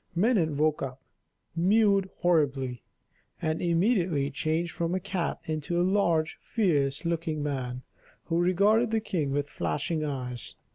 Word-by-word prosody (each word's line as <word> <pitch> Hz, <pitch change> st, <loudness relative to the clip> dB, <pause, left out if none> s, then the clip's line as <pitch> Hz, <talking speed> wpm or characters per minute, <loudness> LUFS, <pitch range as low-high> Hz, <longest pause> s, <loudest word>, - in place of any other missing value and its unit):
Minon 180 Hz, -5 st, +2 dB
woke 155 Hz, 0 st, +2 dB
up, 130 Hz, -1 st, -4 dB, 0.6 s
mewed 195 Hz, +2 st, +3 dB
horribly, 135 Hz, -, +1 dB, 0.6 s
and 155 Hz, 0 st, -1 dB
immediately 170 Hz, -, +1 dB
changed 160 Hz, +4 st, -1 dB
from 170 Hz, +4 st, -1 dB
a -, -, 0 dB
cat 185 Hz, -2 st, -2 dB
into 155 Hz, +2 st, -2 dB
a -, -, +3 dB
large, 170 Hz, -5 st, +1 dB
fierce 150 Hz, -, 0 dB
looking 165 Hz, -3 st, -1 dB
man, 130 Hz, -3 st, -3 dB, 0.4 s
who 165 Hz, 0 st, 0 dB
regarded 200 Hz, +6 st, +3 dB
the 225 Hz, 0 st, +1 dB
king 165 Hz, -10 st, -2 dB
with 145 Hz, +1 st, 0 dB
flashing 145 Hz, -, -2 dB
eyes. 125 Hz, -5 st, -4 dB
165 Hz, 135 wpm, -28 LUFS, 145-185 Hz, 0.6 s, mewed